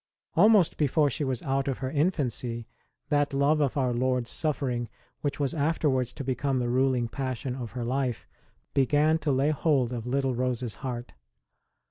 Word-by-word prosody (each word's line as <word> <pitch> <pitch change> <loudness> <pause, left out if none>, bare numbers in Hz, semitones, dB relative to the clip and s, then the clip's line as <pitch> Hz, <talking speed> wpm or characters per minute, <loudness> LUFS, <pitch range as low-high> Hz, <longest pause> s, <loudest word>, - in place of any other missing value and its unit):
Almost 200 0 +5
before 150 0 +2
she 150 - -2
was 130 -3 -2
out 135 0 0
of 135 - -1
her 130 0 -3
infancy, 130 - -1 0.4
that 145 -1 +1
love 145 +2 +3
of 140 -1 0
Our 130 -3 +1
Lord 125 0 +1
s - - -6
suffering, 130 -7 -1 0.3
which 145 -1 -3
was 140 -2 0
afterwards 145 -5 +1
to 140 - -6
become 135 +1 0
the 120 -1 0
ruling 130 -1 +2
passion 130 0 -3
of 125 -3 -6
her 120 -1 -3
life, 130 -1 -1 0.5
began 150 +4 +3
to 150 - 0
lay 135 +3 +2
hold 135 -5 +1
of 120 -1 -5
little 135 0 0
Rose 125 0 -1
s 115 -4 -3
heart. 125 -3 -5
135 Hz, 175 wpm, -28 LUFS, 125-145 Hz, 0.5 s, Almost